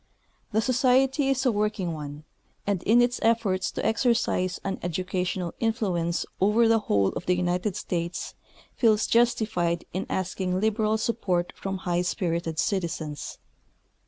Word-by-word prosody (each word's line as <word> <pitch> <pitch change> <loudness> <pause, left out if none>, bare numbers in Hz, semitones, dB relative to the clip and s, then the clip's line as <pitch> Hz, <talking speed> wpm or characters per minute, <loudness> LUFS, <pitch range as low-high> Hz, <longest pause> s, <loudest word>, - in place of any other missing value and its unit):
The 220 0 +2
Society 260 +3 +3
is 270 0 +1
a 250 - +4
work 210 0 -1
ing 175 -3 -1
one, 150 -1 -7 0.4
and 200 -3 0
in 235 +5 +5
its 245 0 0
efforts 220 -5 +1
to - - -3
exercise 220 -5 +1
an 195 - -3
educational 180 0 -2
influence 190 -7 0
over 210 +4 +4
the 225 0 +4
whole 100 - +2
of - - -6
the 180 - +3
United 180 +2 0
States 175 0 -3 0.4
feels 220 -3 +3
justified 215 -8 +1
in 185 - -3
asking 185 0 -1
lib 215 +1 +1
eral 215 0 +2
support 190 -6 -1
from 195 0 -4
public 180 -1 -1
spirited 170 -3 -2
citizens. 160 -6 -2
190 Hz, 145 wpm, -26 LUFS, 175-225 Hz, 0.4 s, in